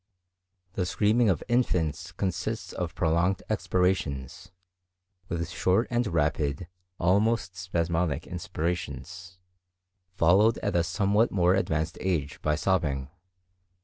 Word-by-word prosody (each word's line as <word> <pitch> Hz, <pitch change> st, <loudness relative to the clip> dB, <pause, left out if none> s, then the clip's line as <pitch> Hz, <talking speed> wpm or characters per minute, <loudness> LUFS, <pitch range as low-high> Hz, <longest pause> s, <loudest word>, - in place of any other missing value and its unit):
The 90 Hz, -2 st, -1 dB
screaming 110 Hz, +4 st, +3 dB
of 90 Hz, -6 st, 0 dB
infants 90 Hz, -, 0 dB
consists 95 Hz, +2 st, -3 dB
of 85 Hz, -1 st, -4 dB
prolonged 85 Hz, +3 st, +1 dB
expirations, 90 Hz, -6 st, -1 dB, 0.8 s
with 85 Hz, -1 st, -2 dB
short 95 Hz, +5 st, +1 dB
and 120 Hz, -1 st, +1 dB
rapid, 75 Hz, -2 st, 0 dB, 0.3 s
almost 100 Hz, +2 st, +1 dB
spasmodic 85 Hz, -4 st, -1 dB
inspirations, 85 Hz, +1 st, -5 dB, 0.8 s
followed 100 Hz, +7 st, +4 dB
at 100 Hz, -, -1 dB
a 85 Hz, -, +3 dB
somewhat 100 Hz, +6 st, +2 dB
more 90 Hz, -2 st, +3 dB
advanced 80 Hz, -4 st, -1 dB
age 80 Hz, -7 st, -2 dB
by 75 Hz, -1 st, +1 dB
sobbing. 75 Hz, -6 st, 0 dB
90 Hz, 105 wpm, -27 LUFS, 80-95 Hz, 0.8 s, followed